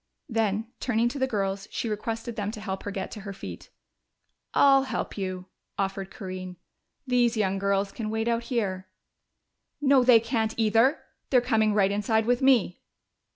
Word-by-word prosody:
Then, 220 Hz, -3 st, 0 dB
turning 235 Hz, -1 st, +1 dB
to 280 Hz, -, -6 dB
the 265 Hz, -, +2 dB
girls, 195 Hz, -3 st, -2 dB
she -, -, -3 dB
requested 225 Hz, +2 st, -4 dB
them 205 Hz, -2 st, -2 dB
to 220 Hz, -, -7 dB
help 195 Hz, -3 st, -4 dB
her -, -, -5 dB
get 195 Hz, -1 st, -4 dB
to 215 Hz, -, -7 dB
her 200 Hz, 0 st, -7 dB
feet. 195 Hz, -, -9 dB, 0.8 s
"I'll 275 Hz, -1 st, +5 dB
help -, -, -3 dB
you," 185 Hz, -2 st, -4 dB, 0.3 s
offered 195 Hz, 0 st, -2 dB
Corinne. 185 Hz, -4 st, -7 dB, 0.5 s
"These 245 Hz, -2 st, +2 dB
young 195 Hz, -2 st, +1 dB
girls 200 Hz, 0 st, 0 dB
can 220 Hz, -2 st, -5 dB
wait 220 Hz, +1 st, -1 dB
out 235 Hz, 0 st, 0 dB
here." 195 Hz, -7 st, -2 dB, 0.9 s
"No, 275 Hz, -3 st, +4 dB
they 245 Hz, -2 st, +7 dB
can't, 225 Hz, -1 st, -1 dB
either! 225 Hz, +6 st, +3 dB, 0.3 s
They're 255 Hz, -, +5 dB
coming 220 Hz, -4 st, +2 dB
right 200 Hz, -2 st, +3 dB
inside 215 Hz, +2 st, +1 dB
with 245 Hz, +2 st, +1 dB
me!" 250 Hz, -9 st, +3 dB
220 Hz, 165 wpm, -27 LUFS, 195-240 Hz, 0.9 s, they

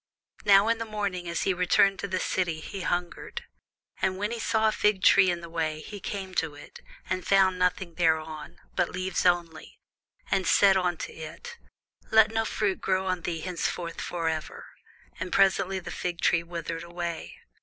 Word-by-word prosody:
Now 200 Hz, +1 st, +6 dB
in 230 Hz, 0 st, +1 dB
the 230 Hz, -, -3 dB
morning 200 Hz, -5 st, -3 dB
as 170 Hz, -, -1 dB
he 190 Hz, -, +2 dB
returned 180 Hz, +3 st, +4 dB
into -, -, -1 dB
the 185 Hz, -1 st, -1 dB
city, 175 Hz, -4 st, -1 dB
he 195 Hz, +4 st, -7 dB
hungered. 180 Hz, -, -3 dB, 0.6 s
And 185 Hz, 0 st, +1 dB
when 205 Hz, +3 st, -2 dB
he 235 Hz, -, -3 dB
saw 220 Hz, 0 st, +2 dB
a -, -, +3 dB
fig 210 Hz, -2 st, +1 dB
tree 190 Hz, -2 st, +6 dB
in 175 Hz, -1 st, -1 dB
the 170 Hz, -, -8 dB
way, 160 Hz, -2 st, -2 dB
he 205 Hz, +5 st, -8 dB
came 190 Hz, -1 st, -5 dB
to 155 Hz, -3 st, -6 dB
it, 145 Hz, -, -12 dB, 0.3 s
and 185 Hz, -1 st, -2 dB
found 190 Hz, -2 st, +3 dB
nothing 180 Hz, -1 st, 0 dB
thereon, 160 Hz, -2 st, -1 dB, 0.2 s
but 180 Hz, -2 st, +1 dB
leaves 185 Hz, 0 st, -1 dB
only, 170 Hz, -2 st, -1 dB, 0.5 s
and 190 Hz, -2 st, +1 dB
said 195 Hz, -1 st, +6 dB
unto 180 Hz, -3 st, -1 dB
it, 160 Hz, -, -9 dB, 0.5 s
Let 220 Hz, 0 st, +6 dB
no 225 Hz, 0 st, 0 dB
fruit 205 Hz, -3 st, -1 dB
grow 190 Hz, 0 st, 0 dB
on 185 Hz, -1 st, -1 dB
thee 165 Hz, -1 st, -3 dB
henceforward 175 Hz, -1 st, -3 dB
for 170 Hz, -2 st, -3 dB
ever. 160 Hz, -1 st, -4 dB, 0.5 s
And 180 Hz, +1 st, -4 dB
presently 195 Hz, -1 st, +3 dB
the 185 Hz, -, -6 dB
fig 175 Hz, -1 st, -4 dB
tree 170 Hz, -, +3 dB
withered 170 Hz, -1 st, -5 dB
away. 170 Hz, -1 st, -5 dB
180 Hz, 180 wpm, -27 LUFS, 170-195 Hz, 0.6 s, Now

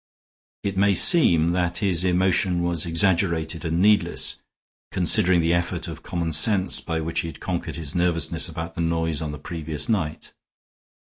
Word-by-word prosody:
It 100 Hz, -1 st, -4 dB
may 100 Hz, 0 st, +3 dB
seem 85 Hz, -, +5 dB
that 90 Hz, -1 st, -1 dB
his 95 Hz, -4 st, 0 dB
emotion 90 Hz, 0 st, +1 dB
was 85 Hz, -1 st, -1 dB
exaggerated 85 Hz, -2 st, 0 dB
and 85 Hz, 0 st, -2 dB
needless, 105 Hz, 0 st, +1 dB, 0.5 s
considering 90 Hz, -1 st, +3 dB
the 85 Hz, +1 st, +1 dB
effort 85 Hz, 0 st, -2 dB
of -, -, -9 dB
common 85 Hz, -2 st, -4 dB
sense 95 Hz, +4 st, +4 dB
by 80 Hz, -1 st, -4 dB
which 80 Hz, +1 st, -3 dB
he -, -, -3 dB
had 80 Hz, -1 st, -10 dB
conquered 90 Hz, -2 st, -5 dB
his 80 Hz, -4 st, -5 dB
nervousness 85 Hz, -3 st, 0 dB
about 80 Hz, 0 st, -7 dB
the 85 Hz, -, -5 dB
noise 80 Hz, -2 st, -1 dB
on 75 Hz, -2 st, -4 dB
the 75 Hz, -, -7 dB
previous 80 Hz, 0 st, -5 dB
night. 90 Hz, -9 st, -3 dB
85 Hz, 165 wpm, -23 LUFS, 80-90 Hz, 0.5 s, seem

